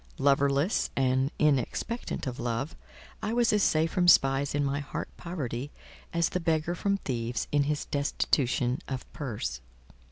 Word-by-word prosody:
Loverless 140 Hz, +5 st, +2 dB
and 130 Hz, 0 st, +2 dB
inexpectant 150 Hz, -, 0 dB
of 125 Hz, -2 st, -4 dB
love, 120 Hz, +5 st, -2 dB, 0.5 s
I 215 Hz, -, -2 dB
was 235 Hz, -2 st, +3 dB
as 210 Hz, -, +3 dB
safe 160 Hz, -2 st, +3 dB
from 180 Hz, -1 st, +2 dB
spies 135 Hz, -3 st, +5 dB
in 145 Hz, -1 st, +1 dB
my 140 Hz, +1 st, 0 dB
heart 145 Hz, -, -5 dB
poverty, 140 Hz, -7 st, -4 dB, 0.4 s
as 170 Hz, -1 st, +1 dB
the 180 Hz, -, -1 dB
beggar 165 Hz, 0 st, 0 dB
from 200 Hz, +3 st, 0 dB
thieves 120 Hz, -, -3 dB
in 145 Hz, -1 st, +3 dB
his 150 Hz, 0 st, -1 dB
destitution 135 Hz, -3 st, +1 dB
of 130 Hz, -1 st, -4 dB
purse. 105 Hz, -, -4 dB
140 Hz, 150 wpm, -29 LUFS, 130-165 Hz, 0.5 s, spies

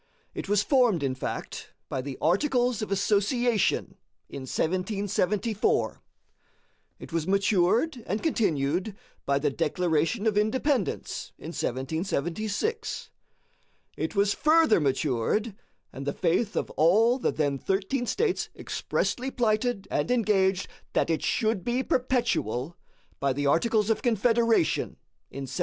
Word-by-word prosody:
It -, -, -6 dB
was 205 Hz, 0 st, +3 dB
formed, 245 Hz, -, +3 dB
in 135 Hz, -2 st, 0 dB
fact, 130 Hz, -, -6 dB
by 130 Hz, -, -3 dB
the 135 Hz, 0 st, -6 dB
Articles 245 Hz, -, +2 dB
of 215 Hz, -, -4 dB
Association 205 Hz, +3 st, +1 dB, 0.3 s
in 130 Hz, -1 st, -7 dB
1774. 200 Hz, +3 st, 0 dB, 1.0 s
It -, -, -11 dB
was 165 Hz, 0 st, -1 dB
matured 200 Hz, -, +2 dB
and 210 Hz, -, -2 dB
continued 180 Hz, -, 0 dB, 0.3 s
by 140 Hz, 0 st, +3 dB
the 145 Hz, 0 st, 0 dB
Declaration 165 Hz, -, 0 dB
of 210 Hz, -2 st, +3 dB
Independence 250 Hz, +2 st, -1 dB
in -, -, -8 dB
1776. 190 Hz, -, -2 dB, 0.8 s
It -, -, -3 dB
was 200 Hz, 0 st, +3 dB
further 315 Hz, -, +4 dB
matured, 145 Hz, -, 0 dB, 0.4 s
and 135 Hz, +1 st, -7 dB
the -, -, 0 dB
faith 190 Hz, +5 st, 0 dB
of -, -, -2 dB
all 220 Hz, -, +4 dB
the -, -, +1 dB
then 145 Hz, -3 st, -1 dB
thirteen 200 Hz, -, -1 dB
States 415 Hz, -, 0 dB
expressly 255 Hz, +2 st, -2 dB
plighted 220 Hz, -4 st, 0 dB
and 145 Hz, +1 st, 0 dB
engaged 195 Hz, -6 st, +2 dB, 0.3 s
that -, -, +1 dB
it 160 Hz, -, 0 dB
should 220 Hz, -5 st, 0 dB
be 245 Hz, +2 st, 0 dB
perpetual, 230 Hz, -, 0 dB, 0.4 s
by 140 Hz, -1 st, +1 dB
the 145 Hz, +2 st, -2 dB
Articles 215 Hz, +8 st, +2 dB
of 225 Hz, -, 0 dB
Confederation 230 Hz, -4 st, +2 dB, 0.3 s
in 140 Hz, -, -6 dB
1778. 135 Hz, -1 st, -6 dB
200 Hz, 125 wpm, -27 LUFS, 160-235 Hz, 1.0 s, further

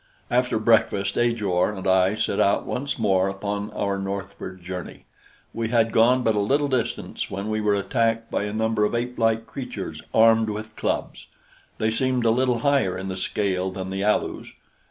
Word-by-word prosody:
After 125 Hz, -1 st, +2 dB
breakfast 110 Hz, -3 st, +2 dB
Ajor 105 Hz, -5 st, +1 dB
and 95 Hz, -, -7 dB
I 95 Hz, +2 st, +3 dB
set 110 Hz, -2 st, -1 dB
out 100 Hz, -, +2 dB
once 140 Hz, +2 st, -3 dB
more 95 Hz, -4 st, +2 dB
upon 100 Hz, +1 st, -3 dB
our 100 Hz, -1 st, -2 dB
northward 95 Hz, -2 st, -6 dB
journey. 90 Hz, 0 st, -7 dB, 0.5 s
We 115 Hz, 0 st, -2 dB
had 115 Hz, -1 st, +2 dB
gone 125 Hz, +3 st, +4 dB
but 110 Hz, -, +3 dB
a 105 Hz, -, 0 dB
little 140 Hz, +8 st, +2 dB
distance 120 Hz, -4 st, -2 dB
when 100 Hz, +2 st, -4 dB
we 110 Hz, 0 st, 0 dB
were 105 Hz, -1 st, +2 dB
attacked 115 Hz, +2 st, 0 dB
by 105 Hz, -, -1 dB
a 105 Hz, -, -3 dB
number 110 Hz, 0 st, 0 dB
of 105 Hz, -, +1 dB
apelike 115 Hz, -2 st, 0 dB
creatures 135 Hz, -2 st, -6 dB
armed 115 Hz, 0 st, +5 dB
with 110 Hz, +1 st, -6 dB
clubs. -, -, -3 dB, 0.5 s
They 110 Hz, 0 st, +1 dB
seemed 125 Hz, +1 st, 0 dB
a 115 Hz, -, +5 dB
little 125 Hz, 0 st, +1 dB
higher 140 Hz, -10 st, +2 dB
in 95 Hz, +1 st, -5 dB
the 95 Hz, -, -3 dB
scale 95 Hz, -1 st, -1 dB
than 95 Hz, 0 st, -6 dB
the 95 Hz, +1 st, -2 dB
Alus. 105 Hz, +1 st, 0 dB
110 Hz, 175 wpm, -24 LUFS, 100-115 Hz, 0.5 s, armed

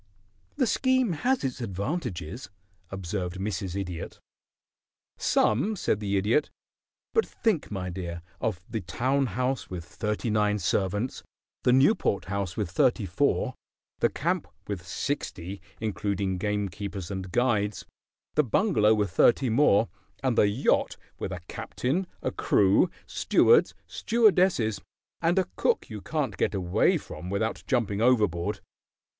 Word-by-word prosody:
"The 255 Hz, -, +2 dB
scheme 260 Hz, -1 st, +2 dB
has 250 Hz, -, 0 dB
its 130 Hz, -1 st, -3 dB
advantages," 105 Hz, -, -4 dB, 0.4 s
observed 95 Hz, -1 st, -4 dB
Mrs. 95 Hz, -1 st, -3 dB
Idiot. 90 Hz, -4 st, -6 dB, 1.0 s
"Some," 135 Hz, -, +2 dB
said 105 Hz, -, 0 dB
the 100 Hz, -1 st, 0 dB
Idiot. 110 Hz, +10 st, +2 dB, 0.6 s
"But 450 Hz, -, +4 dB
think, 215 Hz, -9 st, -1 dB
my 90 Hz, -3 st, -4 dB
dear, 85 Hz, -2 st, -5 dB, 0.2 s
of 100 Hz, -5 st, -2 dB
the 110 Hz, -1 st, -3 dB
town 130 Hz, +9 st, 0 dB
house 125 Hz, +4 st, -2 dB
with 85 Hz, -3 st, -6 dB
thirty 105 Hz, +4 st, -2 dB
nine 105 Hz, -1 st, +2 dB
servants; 100 Hz, +5 st, -1 dB, 0.4 s
the 125 Hz, -, +3 dB
Newport 135 Hz, -, +3 dB
house 100 Hz, -2 st, -3 dB
with 100 Hz, -6 st, -2 dB
thirty 110 Hz, +4 st, +2 dB
four; 130 Hz, +7 st, +1 dB, 0.5 s
the -, -, +3 dB
camp -, -, -1 dB, 0.2 s
with 90 Hz, -4 st, -5 dB
sixty, 95 Hz, -, -4 dB, 0.2 s
including 100 Hz, -3 st, -1 dB
gamekeepers 100 Hz, -2 st, -3 dB
and 95 Hz, -2 st, -5 dB
guides; 105 Hz, -3 st, +1 dB, 0.5 s
the 150 Hz, -, +4 dB
bungalow 110 Hz, -, +3 dB
with 105 Hz, -4 st, 0 dB
thirty 120 Hz, +7 st, +4 dB
more, 115 Hz, -3 st, +4 dB, 0.4 s
and 130 Hz, -3 st, +2 dB
the 105 Hz, -, +5 dB
yacht 105 Hz, +7 st, +1 dB, 0.2 s
with -, -, -3 dB
a 90 Hz, -2 st, -5 dB
captain, 170 Hz, +9 st, -2 dB, 0.2 s
a -, -, 0 dB
crew, 100 Hz, -, +3 dB, 0.2 s
stewards, 465 Hz, -, +4 dB
stewardesses, 185 Hz, -, +2 dB, 0.4 s
and 170 Hz, +2 st, +2 dB
a 190 Hz, -, +3 dB
cook 470 Hz, -, +1 dB
you 105 Hz, -2 st, -6 dB
can't 140 Hz, -8 st, -2 dB
get -, -, 0 dB
away 100 Hz, -, +2 dB
from 85 Hz, -, -8 dB
without 105 Hz, +3 st, -1 dB
jumping 110 Hz, -6 st, 0 dB
overboard. 105 Hz, -9 st, +2 dB
105 Hz, 130 wpm, -27 LUFS, 95-130 Hz, 1.0 s, the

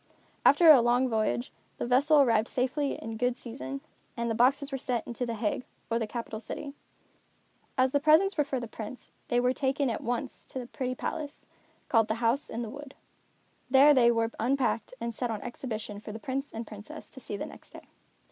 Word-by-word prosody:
After 315 Hz, +3 st, +8 dB
a 270 Hz, -5 st, +8 dB
long 245 Hz, +2 st, +3 dB
voyage, 215 Hz, -, 0 dB, 0.3 s
the -, -, -2 dB
vessel 280 Hz, +5 st, +5 dB
arrived 230 Hz, -4 st, +3 dB
safely 270 Hz, +3 st, 0 dB
in 225 Hz, 0 st, -6 dB
good 250 Hz, +1 st, 0 dB
season, 270 Hz, +3 st, -6 dB, 0.4 s
and 235 Hz, 0 st, -1 dB
the -, -, +1 dB
boxes 275 Hz, +5 st, +2 dB
were 270 Hz, -, -1 dB
sent 245 Hz, -2 st, -1 dB
on -, -, -5 dB
to 245 Hz, +1 st, -2 dB
The 230 Hz, -, -2 dB
Hague, 215 Hz, +2 st, -1 dB, 0.3 s
or 230 Hz, -, +2 dB
capital 225 Hz, 0 st, -4 dB
city. 280 Hz, +5 st, -6 dB, 1.0 s
As 255 Hz, 0 st, +3 dB
the 285 Hz, -, +3 dB
presents 315 Hz, +7 st, +5 dB
were 295 Hz, -, +3 dB
for 270 Hz, -2 st, -2 dB
the 235 Hz, -, -5 dB
Prince, 220 Hz, +3 st, -8 dB, 0.2 s
they 240 Hz, -, +2 dB
were 250 Hz, +1 st, +2 dB
taken 270 Hz, 0 st, 0 dB
at -, -, -3 dB
once 240 Hz, 0 st, -4 dB
to -, -, -8 dB
the 250 Hz, -, -4 dB
pretty 255 Hz, +1 st, -3 dB
palace, 290 Hz, +3 st, -5 dB, 0.4 s
called 225 Hz, -3 st, +3 dB
the 220 Hz, -, 0 dB
House 235 Hz, +4 st, 0 dB
in 235 Hz, +2 st, -3 dB
the 225 Hz, -, -5 dB
Wood. 285 Hz, 0 st, -10 dB, 0.7 s
There 275 Hz, +3 st, +7 dB
they 245 Hz, -3 st, +5 dB
were 230 Hz, -1 st, +1 dB
unpacked 245 Hz, -2 st, 0 dB
and 235 Hz, 0 st, -3 dB
set 245 Hz, +2 st, -2 dB
on 220 Hz, -2 st, -2 dB
exhibition 220 Hz, -4 st, -5 dB
for 210 Hz, -, -8 dB
the 215 Hz, -, -6 dB
Prince 270 Hz, +5 st, -4 dB
and 225 Hz, +1 st, -5 dB
Princess 210 Hz, -1 st, -10 dB
to 265 Hz, -, -10 dB
see 210 Hz, -5 st, -5 dB
the -, -, -4 dB
next -, -, -10 dB
day. -, -, -12 dB
245 Hz, 205 wpm, -29 LUFS, 225-275 Hz, 1.0 s, After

